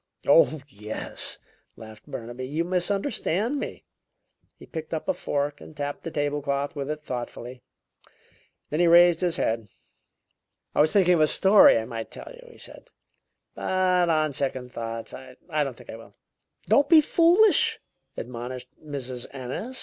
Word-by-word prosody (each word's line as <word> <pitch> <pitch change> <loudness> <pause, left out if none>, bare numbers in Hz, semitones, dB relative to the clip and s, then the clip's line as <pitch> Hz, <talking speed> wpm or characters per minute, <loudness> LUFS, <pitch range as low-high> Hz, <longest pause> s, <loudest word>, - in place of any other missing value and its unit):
"Oh, 145 +1 +4
yes," 105 -4 -2 0.4
laughed 110 -1 -13
Burnaby, 120 +2 -7
"you 155 +5 -1
misunderstand 200 - -1
me." - - -6 0.7
He - - -13
picked 160 0 -6
up 155 - -6
a - - +2
fork 145 0 -3
and 155 - -13
tapped 145 0 -4
the 165 - -5
table 145 -1 -2
cloth 140 +1 -2
with 140 -1 -4
it 150 0 -4
thoughtfully; 125 -1 -6 1.1
then 150 - -1
he 175 - +4
raised 170 0 +6
his 175 -2 +1
head. 115 -1 -1 1.1
"I - - +3
was 155 +1 +3
thinking 185 -3 +4
of 165 - +2
a 155 - +5
story 195 - +6
I 110 - -2
might 115 -2 -6
tell - - -10
you," - - -15
he - - -17
said, - - -10 0.7
"but 185 -2 +1
on 155 -2 +1
second 130 -2 -3
thoughts 115 0 -6
I 130 -1 -11 0.2
don't 145 -5 -1
think - - -11
I - - -8
will." 115 - -16 0.5
"Don't 285 0 +4
be 325 -2 +8
foolish!" 350 +7 +4 0.4
admonished 125 +1 -7
Mrs. 130 -4 -6
Ennis. 135 - -5
145 Hz, 155 wpm, -25 LUFS, 125-175 Hz, 1.1 s, be